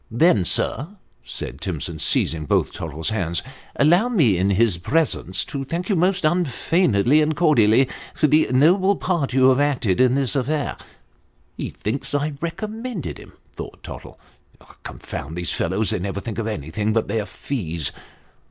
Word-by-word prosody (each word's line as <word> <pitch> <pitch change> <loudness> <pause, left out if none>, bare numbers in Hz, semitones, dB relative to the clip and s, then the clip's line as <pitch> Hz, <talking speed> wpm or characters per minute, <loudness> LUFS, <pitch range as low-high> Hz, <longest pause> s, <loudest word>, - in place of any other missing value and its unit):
" - - -37 0.2
Then, 105 - +4
sir," 135 - +2 0.4
said 65 +3 -5
Timson, 85 -2 -4
seizing 80 0 +1
both - - +1
Tottle's 80 +4 -3
hands, 85 -6 -1 0.2
" - - -27
allow 175 +11 +4
me 150 - +3
in 95 +3 +1
his 100 -2 +2
presence 95 - 0
to 140 -1 -5
thank 170 +8 -4
you 200 - +2
most 185 0 +1
unfeignedly 155 - +2
and 155 0 0
cordially, 130 -7 +4 0.3
for - - +2
the 150 +2 +4
noble 185 +9 +4
part 170 -8 -1
you 130 0 +5
have 130 +1 +3
acted 130 -9 +1
in 130 0 +4
this 135 0 -1
affair." 140 +2 -1 0.4
" - - -40
He - - -4
thinks 135 +6 -4
I 145 +1 -1
recommended 215 +4 -5
him," - - -14 0.2
thought - - -9
Tottle. - - -10 0.3
" - - -22
Confound 80 +5 -7
these 90 -1 -2
fellows! 100 +6 0
they 110 - -1
never 100 +2 -3
think 110 +2 -6
of 110 - -2
anything 105 +3 -2
but 115 - 0
their 105 0 -2
fees." 85 - -3
130 Hz, 170 wpm, -22 LUFS, 95-155 Hz, 0.4 s, you